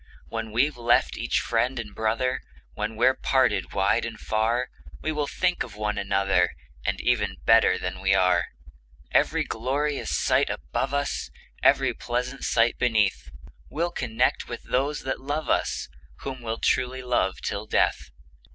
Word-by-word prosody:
When 115 -1 -4
we've 130 +5 +1
left 120 0 +2
each - - 0
friend 125 +3 0
and 105 -4 -5
brother, 115 +4 0 0.3
When 105 +1 -3
we're 125 +4 +4
parted 130 0 +1
wide 100 +4 +2
and 115 -1 -5
far, 115 +3 0 0.3
We - - -2
will 150 -2 -1
think 180 +3 0
of 115 -5 -4
one 105 0 -2
another, 95 -4 +1 0.3
As - - +2
even - - +1
better - - +5
than 95 - -4
we 95 0 +3
are. 90 -2 +3 0.6
Every - - +3
glorious 140 +5 -2
sight - - +2
above 70 - -2
us, 140 0 -1 0.3
Every - - +4
pleasant 125 +3 -3
sight 115 +1 +2
beneath, 110 - +1 0.4
We'll 170 +2 -1
connect 120 -8 0
with - - -6
those 140 +4 0
that 135 0 -3
love 145 +3 -2
us, - - 0 0.3
Whom 130 -2 -6
we 115 -1 -3
truly 130 +1 0
love 120 -6 0
till 105 +1 -3
death! - - +1
120 Hz, 150 wpm, -26 LUFS, 105-130 Hz, 0.6 s, better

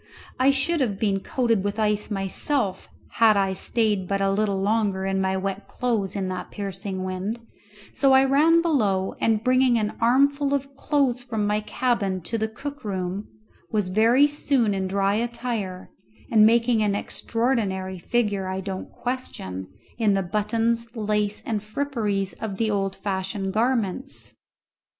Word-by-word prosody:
I 260 +1 +5
should 285 +4 +2
have 210 -7 0
been 200 -2 +1
coated 230 -2 0
with 205 +1 -2
ice 210 -1 0
myself 195 +2 -1 0.3
had 220 -2 +6
I 195 -1 +1
stayed 205 -1 0
but 195 +1 0
a 195 0 +2
little 200 -1 0
longer 200 -2 +1
in 195 0 0
my 190 0 0
wet 195 +1 -4
clothes 225 -6 -1
in 195 -2 -1
that 185 -1 -5
piercing 195 -1 -5
wind, 185 +5 -3 0.5
so 275 -1 +3
I 265 0 +6
ran 315 +5 +4
below, 205 - +1
and 220 -1 +2
bringing 255 -1 +4
an 215 -1 -1
armful 280 +4 +3
of 275 0 -4
clothes 275 -3 +1
from 220 -4 -2
my 210 +1 +1
cabin 215 -4 -1
to 220 +7 -3
the 220 - 0
cook 285 +6 -8
room, 190 0 -3 0.4
was 210 -4 0
very 230 +8 +5
soon 275 -7 +1
in 190 -1 -1
dry 195 +1 +1
attire, 230 -5 -3 0.4
and 215 -2 +7
making 230 0 +3
an 205 -2 +1
extraordinary 205 -5 -1
figure, 205 -2 0
I 190 0 -3
don't 190 0 -5
question, 95 - -5 0.3
in 210 -3 +3
the 195 - +1
buttons, 230 +5 -1
lace, 210 -1 -1
and 215 -3 -1
fripperies 215 -4 -2
of 210 -4 -4
the 220 0 +1
old 195 -1 -1
fashioned 190 0 -3
garments. 240 +2 -1
215 Hz, 155 wpm, -24 LUFS, 195-240 Hz, 0.5 s, and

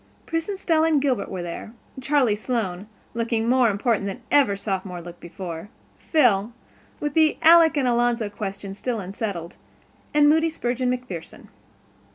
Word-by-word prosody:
Pris 330 +3 -2
and 400 - -3
Stella 325 -4 +2
and 310 -3 +3
Gilbert 265 -7 0
were 185 -2 -4
there, 175 +5 -7 0.3
Charlie 260 -5 +2
Sloane, 210 -4 -3 0.3
looking 230 -1 -1
more 250 -1 +4
important 205 0 0
than 195 - -6
ever 280 -8 +4
a - - -5
Sophomore 190 -3 -4
looked 175 0 -10
before, 175 +1 -7 0.3
Phil, 235 - +2 0.5
with 295 -1 -2
the 315 -1 +3
Alec 325 -1 +7
and 265 -3 +2
Alonzo 240 -2 +1
question 200 -2 -6
still 230 +3 -3
unsettled, 190 -3 -5 0.6
and 295 0 +5
Moody 320 +2 +4
Spurgeon 250 -4 -2
MacPherson. 250 -10 -6
230 Hz, 155 wpm, -24 LUFS, 195-285 Hz, 0.6 s, Alec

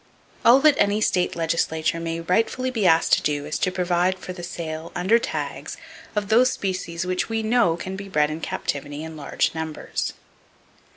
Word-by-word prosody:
All 245 +3 +7
that 305 0 +7
any 205 +1 +3
state 180 -4 +1
legislature 165 -1 0
may 165 0 -3
rightfully 225 +9 0
be 220 -6 +1
asked 165 -1 +4
to - - +5
do 145 -1 -1
is 150 - -3
to - - +2
[Page 185 - -10
370] 180 0 +2
provide - - -20
for 185 - -5
the 180 - -9
sale, 165 -2 -5
under 190 +7 +3
tags, - - -4 0.4
of 205 -1 -1
those 245 +3 +5
species 180 -5 -3
which 185 +3 -1
we 225 0 -1
know 220 -7 +3
can 190 +2 -5
be 200 0 -7
bred 150 -4 +2
in 155 +2 -5
captivity 145 0 -3
in 160 0 -7
large 145 -2 -1
numbers. 160 -1 -4
180 Hz, 190 wpm, -23 LUFS, 160-205 Hz, 0.4 s, All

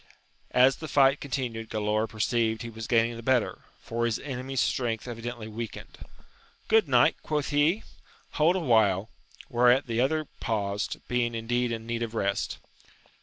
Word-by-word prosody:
As 130 +1 +4
the 155 - -7
fight 135 -1 +4
continued 120 -5 -4
Galaor 110 0 0
perceived 110 0 0
he 115 - -6
was 110 0 -7
gaining 115 0 +2
the - - -7
better, 125 -1 +1 0.2
for 115 +1 -2
his 115 - 0
enemy's 135 -1 -4
strength 115 -4 0
evi 120 -2 -7
dently 120 -2 -5
weakened: 110 -1 -7 0.7
Good 220 -5 +4
knight? 125 -3 +4
quoth 150 -2 -2
he, 155 +8 +2 0.5
hold 160 +4 +3
a - - +1
while! 110 - +2 0.4
whereat 125 +2 +4
the 115 0 0
other 155 +4 +1
paused, 100 -2 -2
being 120 -1 0
indeed 120 +2 -1
in 115 -1 -4
need 115 0 -3
of 115 -1 -3
rest. 100 -2 -1
120 Hz, 160 wpm, -27 LUFS, 115-135 Hz, 0.7 s, As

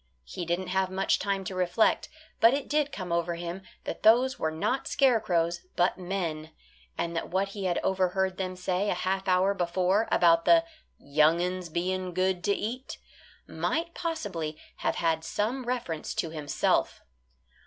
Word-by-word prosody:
He 170 - -6
didn't 175 +2 -2
have 190 0 +1
much 190 +1 +1
time 195 -1 -1
to 190 - -5
reflect, 185 +4 +2 0.3
but 230 +4 +6
it 280 -2 -4
did 295 -1 +1
come 185 -7 -6
over 170 0 0
him 170 +2 -5 0.2
that - - -5
those 250 +4 +4
were 160 - 0
not 160 +12 -1
scarecrows, 175 - +2
but 180 +2 +2
men, 175 -4 -3 0.5
and 170 0 -2
that 165 - -3
what 195 +2 0
he 195 -1 -5
had 175 -2 +1
overheard 190 0 +1
them 185 -1 -3
say 185 +2 -1
a - - +1
half 190 +2 -2
hour 185 +2 +3
before 185 +3 +1
about 165 -1 +4
the 330 -1 +6 0.3
"young 155 +4 +3
uns 180 0 -2
being 180 +2 -2
good 185 -1 +1
to 205 - +3
eat" 245 +5 -5 0.5
might 335 +2 -2
possibly 200 - -3 0.2
have - - -1
had 165 -1 0
some 235 +9 -2
reference 240 -11 -3
to 165 - -2
himself. 150 -3 0
185 Hz, 165 wpm, -28 LUFS, 170-205 Hz, 0.5 s, but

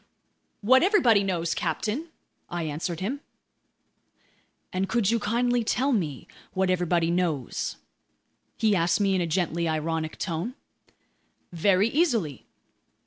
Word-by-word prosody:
"What 260 +5 +5
everybody 290 - +4
knows, 170 -3 -1
captain," 245 +10 -2 0.4
I 175 -1 -3
answered 160 +3 -3
him. 250 +9 -2 1.5
"And 190 +1 -1
could 225 -3 +2
you 230 - +2
kindly 240 +3 +1
tell 265 +5 +1
me 160 - -2 0.3
what 190 -1 +1
everybody 175 -2 +1
knows?" 170 -8 -1 0.8
he 215 -2 +3
asked 170 +1 +2
me 200 -1 +2
in 185 - +1
a 170 - 0
gently 170 0 0
ironic 160 0 -2
tone. 185 +8 -3 1.0
"Very 190 +4 +3
easily." 230 - 0
185 Hz, 120 wpm, -26 LUFS, 165-230 Hz, 1.5 s, What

